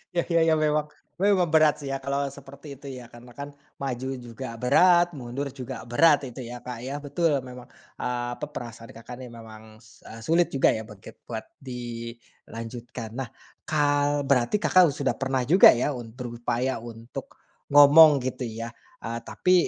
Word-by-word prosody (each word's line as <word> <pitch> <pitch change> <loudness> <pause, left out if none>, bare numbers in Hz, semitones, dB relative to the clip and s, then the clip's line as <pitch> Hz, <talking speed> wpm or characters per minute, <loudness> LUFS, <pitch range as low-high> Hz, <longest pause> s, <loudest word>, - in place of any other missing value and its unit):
iya 170 - +2 0.3
iya - - +4
memang 150 0 +1 0.4
memang 195 -3 +3
berat 155 -1 +6
sih 145 - -7
ya, - - -1
kalau 140 +1 -1
seperti 140 +2 -13
itu 140 - -12
ya, 120 - -11
karena 120 +1 -13
kan 140 0 -5 0.3
maju 130 -1 -3
juga 120 +2 -8 0.2
berat, 175 +6 +5
mundur 130 +3 -4
juga 125 -1 -6
berat 145 +2 +5
itu 125 +2 -9
ya 125 - -6
Kak 125 -1 -5
ya. 130 +2 -5
Betul 160 +3 +1
memang, 125 -1 -10 0.3
eee, 120 0 -2
pe - - -1
perasaan 115 -3 -8
Kakak 115 +2 -9
nih 125 - -8
memang, 110 -1 -13
se 110 -1 -20
eee, 115 - -10
sulit 170 +2 +3
juga 135 - +3
ya 110 - -3
buat 105 -2 -12
kit - - -13
buat 110 -2 -5 0.2
dilanjutkan. 115 -1 -8
Nah 130 - -4 0.4
kal 145 -1 +1
berarti 135 - +2
Kakak 185 -3 +5
sudah 140 -3 -1
pernah 135 -1 0
juga 175 +9 +8
ya 125 +4 0
untru 120 0 -7
upaya 120 +1 -1
untuk 115 0 -9 0.3
ngomong 145 +1 +8
gitu 130 0 -4
ya, 115 +1 -6 0.3
eee, 115 +1 -3
tapi 180 +9 0
130 Hz, 170 wpm, -26 LUFS, 120-145 Hz, 0.4 s, juga